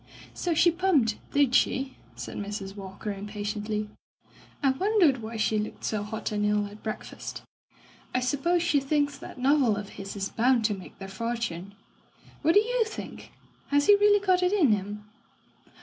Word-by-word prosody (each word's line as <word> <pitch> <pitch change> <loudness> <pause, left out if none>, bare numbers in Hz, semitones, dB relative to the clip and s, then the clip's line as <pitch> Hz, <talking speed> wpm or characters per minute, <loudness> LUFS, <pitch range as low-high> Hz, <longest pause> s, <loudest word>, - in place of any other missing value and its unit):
"So 345 -2 -1
she 345 +2 +5
pumped, 325 - +2
did 280 -3 +3
she?" 265 +2 +2 0.2
said 120 +1 -7
Mrs. 200 -1 -5
Walker 195 +1 -6
impatiently. 210 +1 -3 0.8
"I 270 - +5
wondered 340 - +3
why 225 +1 -6
she 215 0 +1
looked 210 - -5
so 215 -2 -1
hot 215 +2 -4
and 210 -1 -1
ill 210 0 +2
at 205 +1 -11
breakfast. 215 - -6 0.7
I 255 - +1
suppose 290 +7 +1
she 295 -4 +3
thinks 285 +1 0
that - - -10
novel 260 -3 +3
of 205 -1 -5
his 195 +1 -8
is 195 0 -2
bound 240 -1 +2
to 215 - +2
make 190 -2 -10
their 195 - -7
fortune.... 200 -3 -4 0.7
What 325 +2 +3
do 410 - +8
you 485 +1 +1
think? 440 0 -8 0.4
Has 285 0 +3
he 410 - +8
really 410 0 +4
got 370 -1 +4
it 360 +2 +2
in 330 - +4
him?' 205 +1 -2
230 Hz, 170 wpm, -27 LUFS, 210-300 Hz, 0.8 s, do